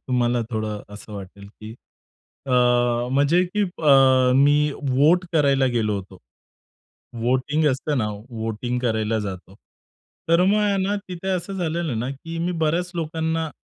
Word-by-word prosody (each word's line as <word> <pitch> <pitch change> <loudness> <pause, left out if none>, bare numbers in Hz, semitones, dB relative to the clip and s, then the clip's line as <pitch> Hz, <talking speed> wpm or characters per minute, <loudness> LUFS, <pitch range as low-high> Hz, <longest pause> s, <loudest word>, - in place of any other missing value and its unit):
तुम्हाला 120 -1 +1
थोडं 110 -2 -3
असं 105 +1 -12
वाटेल, 100 0 -9
की 110 +1 -9 0.7
अ, 130 - -2 0.6
म्हणजे 145 +6 +3
की 205 +4 -2
अ, 175 -6 0 0.5
मी 145 +2 +3 0.2
वोट 155 +8 +3
करायला 140 -4 +3
गेलो 115 -4 0
होतो. 95 -1 -9 1.0
वोटिंग 130 +6 0
असतं 140 +2 -2
ना 110 -3 0 0.2
वोटिंग 115 +2 -3
करायला 110 -2 0
जातो. 95 -2 -7 0.7
तर 170 +2 +4
मग 205 +2 +3
आहे 205 -1 +1
ना 200 +2 0
तिथे 180 +1 -6
असं 185 +1 -2
झालेलं 165 -7 -2
ना, 125 +4 -3
की 165 +5 -7
मी 175 +2 -1
बऱ्याच 170 +3 0
लोकांना 160 -1 -2
140 Hz, 140 wpm, -22 LUFS, 115-165 Hz, 1.0 s, तर